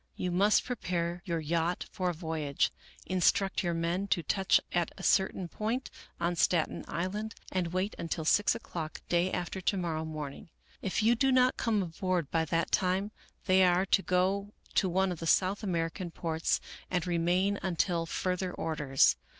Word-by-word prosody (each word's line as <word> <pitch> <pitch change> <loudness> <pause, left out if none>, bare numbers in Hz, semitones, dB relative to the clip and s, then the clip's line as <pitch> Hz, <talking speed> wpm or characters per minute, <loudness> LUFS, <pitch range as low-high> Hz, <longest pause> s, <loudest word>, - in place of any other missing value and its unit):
You 180 - -2
must 200 +4 +3
prepare 175 -7 -2
your 170 -2 -1
yacht 165 +3 -1
for 185 -1 -1
a - - -1
voyage, 155 -4 -1 0.3
instruct 195 +2 +2
your 175 -3 -1
men 170 +4 -1
to 175 -3 +1
touch 190 +5 +3
at 175 -1 0
a 190 - -9
certain 190 -2 +2
point 225 +8 -3 0.3
on 170 +1 0
Staten 165 -1 +1
Island, 205 +6 -3 0.2
and 180 -3 -1
wait 185 +3 -1
until 165 -1 -3
six 205 +8 +4
o'clock 165 -8 -6
day 175 +2 +2
after 180 +2 -3
to 195 +2 +1
morrow 165 -3 -2
morning. 155 -1 -6 0.3
If 190 +1 -1
you 230 +2 +5
do 265 +3 +2
not 255 0 +4
come 215 -4 +1
aboard 175 -2 -2
by 165 -1 +2
that 165 +2 0
time, 190 +2 +1 0.3
they 190 0 +5
are 180 +1 +4
to 195 - +3
go 195 +3 0 0.2
to 190 - +2
one 190 +1 +2
of 175 - -5
the 165 - -4
South 190 +5 +3
American 170 -2 -2
ports 165 0 -1 0.3
and 180 -3 0
re 175 -2 0
main 185 +4 +2
until 170 -2 0
further 180 +2 -1
orders. 150 -6 +2
180 Hz, 175 wpm, -30 LUFS, 165-195 Hz, 0.3 s, you